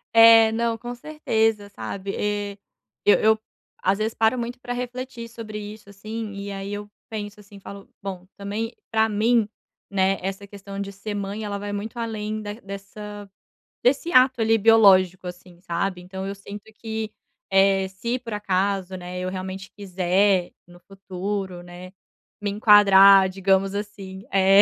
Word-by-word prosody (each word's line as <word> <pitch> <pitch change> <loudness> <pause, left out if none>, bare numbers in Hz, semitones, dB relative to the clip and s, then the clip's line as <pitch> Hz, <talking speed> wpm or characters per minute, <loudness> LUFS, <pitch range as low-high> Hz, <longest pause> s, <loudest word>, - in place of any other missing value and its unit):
É, 225 -1 +8
não, 230 0 0
com 240 +2 -6
certeza, 225 -7 -1
sabe? 200 -1 -5 0.9
Eu 205 - +5
eu 220 0 +4 0.4
às 195 +1 +2
vezes 220 +1 -1
paro 225 +3 +2
muito 240 +1 -4
para 245 - -6
refletir 245 -1 -5
sobre 225 -2 -8
isso, 210 0 -9
assim, 215 +2 -6
e 200 0 -6
aí 195 0 -5
eu 205 0 -5 0.2
penso, 210 -1 -6
assim, 205 -1 -14
falo: 200 0 -11
"Bom, 190 -2 -6
também 210 +4 -4 0.2
para 220 0 +3
mim, 220 +1 +2 0.4
né, 195 0 +2
essa 195 +2 -4
questão 200 0 -9
de 200 0 -4
ser 205 +2 -6
mãe, 200 +2 -4
ela 205 -1 -3
vai 205 0 -5
muito 215 +4 -5
além 215 -2 -3
da 205 0 -5
dessa 205 0 -9 0.6
desse 280 +7 +2
ato 255 0 +5
ali 225 0 +4
biológico, 195 -4 +5
assim.", 180 0 -10
sabe, 180 +1 -2
então 190 +2 -6
eu 200 - -4
sinto 200 +2 -10
que, 220 -1 -5 0.8
se 235 +7 -3
por 230 -3 -7
acaso 195 -1 -1
não 180 -1 -8
é 180 0 -5
eu, 185 - -2
realmente 190 0 -6
quiser 185 -1 +1 0.2
no 175 0 -16
futuro, 190 -1 -5
né, 175 +1 -11 0.5
me 205 -1 -2
enquadrar 200 -2 +7
digamos, 195 +1 +1
assim, 200 -2 -6
é 195 +1 +6
200 Hz, 155 wpm, -24 LUFS, 195-220 Hz, 0.9 s, É